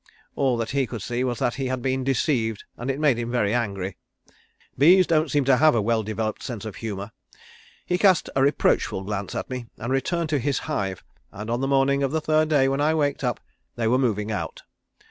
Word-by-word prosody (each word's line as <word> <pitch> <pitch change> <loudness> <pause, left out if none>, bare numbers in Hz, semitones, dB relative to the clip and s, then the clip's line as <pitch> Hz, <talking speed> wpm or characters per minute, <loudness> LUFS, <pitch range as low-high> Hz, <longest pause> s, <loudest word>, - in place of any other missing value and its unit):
All 130 -3 +1
that 115 0 -3
he 135 -2 +1
could 115 -5 -6
see 120 +1 -2
was 125 -2 -1
that 120 - 0
he 135 -1 -3
had 130 -1 -3
been 130 0 0
deceived, 120 -4 0
and 120 +3 -5
it 135 +1 -1
made 145 -6 +3
him 120 0 -3
very 115 -4 +1
angry. 100 -6 -2 0.8
Bees 180 +7 +6
don't 155 -2 +2
seem 145 -1 +1
to 135 -1 +4
have 155 -2 +5
a 115 - +2
well 115 +1 +1
developed 110 0 -3
sense 115 -5 -6
of 110 - -7
humour. 105 -2 -5 0.7
He 180 0 0
cast 190 -4 +4
a 135 - +2
reproachful 135 -8 +2
glance 100 -1 -4
at - - -3
me 125 -2 -5
and 120 +3 -3
returned 165 +5 -1
to 150 -2 +1
his 140 +2 0
hive 100 - -3 0.3
and 105 +3 -6
on 120 +2 -1
the 135 - 0
morning 140 0 +2
of 135 -1 0
the 160 - +1
third 155 0 +2
day 140 -3 +4
when 135 +1 0
I 155 +2 +2
waked 145 -3 0
up 125 -1 -1 0.4
they 115 -2 -1
were 125 +3 +3
moving 110 -4 0
out. 105 - -4
130 Hz, 220 wpm, -24 LUFS, 110-140 Hz, 0.8 s, Bees